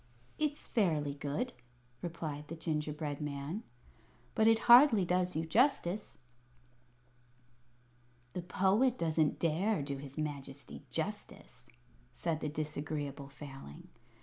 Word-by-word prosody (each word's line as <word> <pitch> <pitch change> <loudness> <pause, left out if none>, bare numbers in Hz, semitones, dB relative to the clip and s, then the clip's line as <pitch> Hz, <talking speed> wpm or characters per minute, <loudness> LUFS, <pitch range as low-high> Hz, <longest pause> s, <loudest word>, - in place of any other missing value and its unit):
"It's 300 -1 0
fairly 155 - +1
good," 145 - -3 0.5
replied 155 -4 -5
the 165 - -6
gingerbread 150 -2 -3
man; 145 +6 -3 0.7
"but 220 - +4
it 225 0 +6
hardly 240 -5 +8
does 180 +1 +1
you 160 +1 0
justice." 215 - +1 2.2
"The 180 - -3
Poet 195 +8 +2
doesn't 160 -2 +2
dare 170 +2 +1
do 140 0 -3
his 140 +1 -9
Majesty 140 -2 -5
justice," 160 -9 -5 0.4
said 160 +5 -2
the 150 - -2
Disagreeable 145 -2 -4
Failing. 135 - -10
155 Hz, 105 wpm, -33 LUFS, 145-190 Hz, 2.2 s, hardly